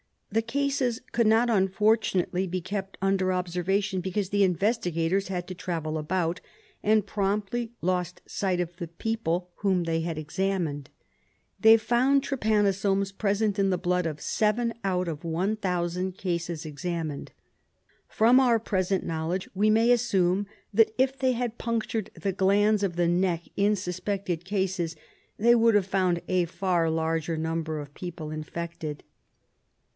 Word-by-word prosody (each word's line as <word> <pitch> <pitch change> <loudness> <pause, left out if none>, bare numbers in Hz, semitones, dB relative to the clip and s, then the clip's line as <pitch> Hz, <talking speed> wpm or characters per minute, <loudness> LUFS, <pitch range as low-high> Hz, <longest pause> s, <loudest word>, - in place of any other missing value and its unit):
The 225 +2 +2
cases 260 0 -1
could 235 -2 +2
not, 225 +2 +4
unfortunately, 195 -2 +2
be 185 +1 -3
kept 195 +1 -5
under 190 -1 +2
observation, 185 +2 -1
because 190 +1 -2
the 205 0 +3
investigators 185 -1 0
had 180 -2 -3
to - - -4
travel 165 -3 -3
about, 170 +2 -1 0.4
and 215 -1 +3
promptly 210 +4 -2
lost 180 -1 -1
sight 185 -3 -1
of 175 0 -5
the 170 - -5
people 180 -1 -2
whom 190 -3 +1
they 165 -1 0
had 165 -1 -3
examined. 155 -3 -2 0.7
They 220 +3 +8
found 255 +5 +2
trypanosomes 200 -6 +1
present 205 0 0
in 195 0 +3
the 180 - +1
blood 180 0 0
of 155 -2 -5
seven 230 +2 +1
out 185 -2 0
of 155 0 -6
one 180 +6 0
thousand 180 -1 -2
cases 170 -3 -3
examined. 155 -1 -4 0.7
From 235 +4 +5
our 245 -3 +4
present 190 -3 -1
knowledge 165 +3 -2
we 205 +3 +2
may 225 +3 +4
assume 200 -5 +2 0.3
that 220 +1 +4
if 265 +1 +1
they 260 -1 +2
had 240 -1 -3
punctured 225 -2 -2
the 195 - -1
glands 205 +2 +3
of 185 -4 -1
the 175 -1 +2
neck 175 -1 +1
in 205 +1 +3
suspected 185 -2 -3
cases 190 -4 -1 0.4
they 235 +3 +5
would 230 -2 +4
have 205 -3 +3
found 185 -3 +1
a 185 -1 +2
far 175 -1 0
larger 160 0 -1
number 160 -1 -2
o£ 145 - -23
people 165 -3 -6
infected. 155 -1 -5
190 Hz, 145 wpm, -27 LUFS, 170-215 Hz, 0.7 s, They